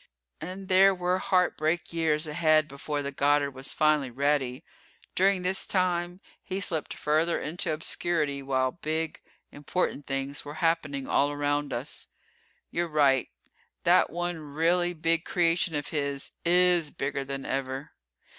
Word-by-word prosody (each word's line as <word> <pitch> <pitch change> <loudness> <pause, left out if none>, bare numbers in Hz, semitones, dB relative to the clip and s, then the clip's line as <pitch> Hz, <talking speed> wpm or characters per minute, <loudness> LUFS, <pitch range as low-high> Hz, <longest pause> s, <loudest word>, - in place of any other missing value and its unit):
And 185 +3 -7
there 190 +1 +5
were 180 +1 0
heartbreak 175 -4 0
years 160 -2 +1
ahead 155 0 +3
before 145 +1 -4
the 140 - -4
Goddard 140 0 +2
was 135 +1 -5
finally 155 -3 +2
ready. 135 +1 -1 0.5
During 190 0 +2
this 185 +1 +2
time 180 -1 0 0.2
he 190 +1 -4
slipped 165 -6 -2
further 155 +3 +1
into 165 +2 -2
obscurity 155 -2 -1
while 130 -1 0
big, 160 0 -3 0.3
important 145 0 -2
things 135 +1 -2
were 145 +1 -8
happening 155 -5 0
all 145 +1 +2
around 145 0 -1
us. - - -3 0.6
You're 175 +1 -1
right, 140 -4 +3 0.5
that - - +4
one 175 +1 -3
really 165 +4 +1
big 165 +1 +1
creation 170 -1 +1
of 145 0 -3
his 140 -3 -2
is 175 -2 +4
bigger 140 -1 -3
than 135 0 -6
ever. 135 +2 -3
155 Hz, 135 wpm, -27 LUFS, 140-175 Hz, 0.6 s, there